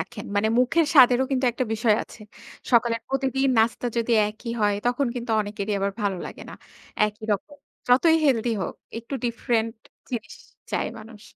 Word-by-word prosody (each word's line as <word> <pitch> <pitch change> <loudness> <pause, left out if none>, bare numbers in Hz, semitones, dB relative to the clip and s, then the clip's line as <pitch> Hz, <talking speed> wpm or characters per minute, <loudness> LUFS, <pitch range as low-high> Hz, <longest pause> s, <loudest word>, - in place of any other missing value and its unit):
রাখেন। 165 - -7
মানে 215 +2 +2
মুখের 305 +6 +3
স্বাদেরও 255 -2 +7
কিন্তু 265 -1 0
একটা 255 - -2
বিষয় 220 -1 +2
আছে। - - -14 0.5
সকালের 235 -1 +3
প্রতিদিন 270 0 0
নাস্তা 230 +2 +1
যদি 235 0 0 0.2
একই 230 +2 -7
হয়, 205 -1 +3
তখন 250 +2 +1
কিন্তু 240 -1 -5
অনেকেরই 205 0 -4
আবার 200 0 -1
ভালো 200 -2 0
লাগে - - -10
না, - - -8 0.5
একই 210 +1 -8
রকম। 285 +9 -4 0.3
যতই 320 +7 +5
হেলদি 240 -4 +2
হোক, - - -4 0.2
একটু 235 +4 -7
ডিফারেন্ট 230 -1 0 0.4
জিনিস 225 -4 -5 0.4
চায় - - -1
মানুষ। 215 -1 -13
235 Hz, 165 wpm, -24 LUFS, 215-255 Hz, 0.5 s, স্বাদেরও